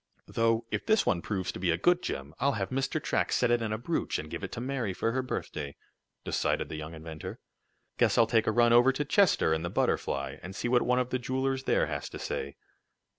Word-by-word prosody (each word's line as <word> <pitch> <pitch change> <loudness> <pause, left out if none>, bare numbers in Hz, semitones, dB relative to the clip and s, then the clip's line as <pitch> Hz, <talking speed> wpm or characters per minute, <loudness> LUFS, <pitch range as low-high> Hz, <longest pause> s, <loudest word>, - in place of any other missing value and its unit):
"Though 115 0 +1
if - - -1
this 220 0 +4
one 85 - +1
proves 95 -2 -2
to - - -8
be 90 -1 0
a 85 - +3
good 175 - +3
gem, 70 +3 -4
I'll 140 +2 +2
have 100 -1 -3
Mr. 135 +3 0
Track - - 0
set 125 -1 +2
it 120 0 +3
in 110 -2 -2
a 110 - 0
brooch, 160 +9 -1
and 75 - -7
give 85 - -5
it 95 - -4
to 120 - -4
Mary 125 -5 -2
for 115 - 0
her 130 +2 0
birthday," 75 - -5 0.5
decided - - 0
the - - -5
young 75 +1 -6
inventor. 80 0 -7 0.6
"Guess - - +3
I'll 115 - +7
take 115 -1 +2
a - - +4
run 120 +1 +4
over 120 +3 +7
to 145 +3 -2
Chester 175 - +3
in 80 - 0
the 85 - -3
Butterfly, - - -1
and 95 +2 -8
see 120 - -2
what 120 0 +4
one 125 0 +2
of 125 0 0
the 130 - 0
jewelers 130 +2 -1
there - - +3
has - - -4
to - - -7
say." 70 - -4
115 Hz, 240 wpm, -29 LUFS, 85-130 Hz, 0.6 s, I'll